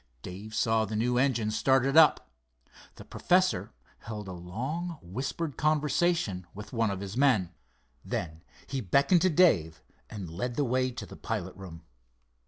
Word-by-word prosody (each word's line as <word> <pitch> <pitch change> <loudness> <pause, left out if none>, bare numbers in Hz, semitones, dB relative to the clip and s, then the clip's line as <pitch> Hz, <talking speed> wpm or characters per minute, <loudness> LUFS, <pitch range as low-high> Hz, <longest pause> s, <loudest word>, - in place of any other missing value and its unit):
Dave 100 +4 -8
saw 110 -1 +2
the 110 0 -4
new 120 +3 +1
engine 120 -5 +1
started 135 +4 +2
up. 160 -1 +5 0.6
The - - -12
professor 120 - +1 0.3
held 105 -3 -7
a - - -6
long, 130 - -5
whispered 135 - -4
conversation 155 - +1
with 105 +2 -9
one 115 -2 +1
of 100 -1 -4
his 100 +1 -6
men. 120 -10 +3 0.5
Then 80 -1 -4 0.2
he 135 -1 -3
beckoned 140 - +3
to 185 - +4
Dave 105 - +3 0.3
and 100 -4 -7
led 120 +10 -4
the 145 - +1
way 130 +1 +1
to 125 - -7
the - - -11
pilot 100 -5 -4
room. 90 -4 -10
115 Hz, 155 wpm, -29 LUFS, 95-140 Hz, 0.6 s, up